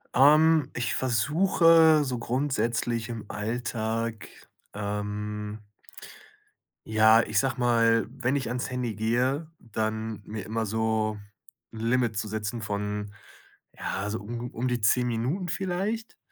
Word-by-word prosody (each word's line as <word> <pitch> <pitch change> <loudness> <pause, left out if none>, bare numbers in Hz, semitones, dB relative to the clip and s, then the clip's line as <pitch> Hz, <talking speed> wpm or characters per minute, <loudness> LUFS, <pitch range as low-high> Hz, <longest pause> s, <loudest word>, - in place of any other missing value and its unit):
Ähm, 155 +2 +5
ich 125 +1 -1
versuche 160 - +4
so 130 -3 -3
grundsätzlich 120 -2 -1
im 115 -2 -6
Alltag, 115 0 -3 0.5
ähm 105 +1 -4 1.2
ja, 110 +1 +6
ich - - +1
sage 135 -1 -1
mal, 115 -1 +3
wenn 130 +1 -1
ich 130 -4 -2
ans 125 +1 -3
Handy 125 -3 -2
gehe, 125 +8 0
dann 110 -1 -3
mir 105 -2 -6
immer 110 +1 -2
so 110 0 0 0.6
'n 110 - -8
Limit 115 -1 +1
zu 110 - -2
setzen 110 +2 -4
von, 105 0 -3 0.6
ja, 95 - -4
also 105 +3 -3
un 120 +3 -6
um 125 +3 -2
die 125 -2 -1
10 125 +4 +3
Minuten 125 - -1
vielleicht? 195 +6 -3
115 Hz, 125 wpm, -27 LUFS, 110-130 Hz, 1.2 s, ja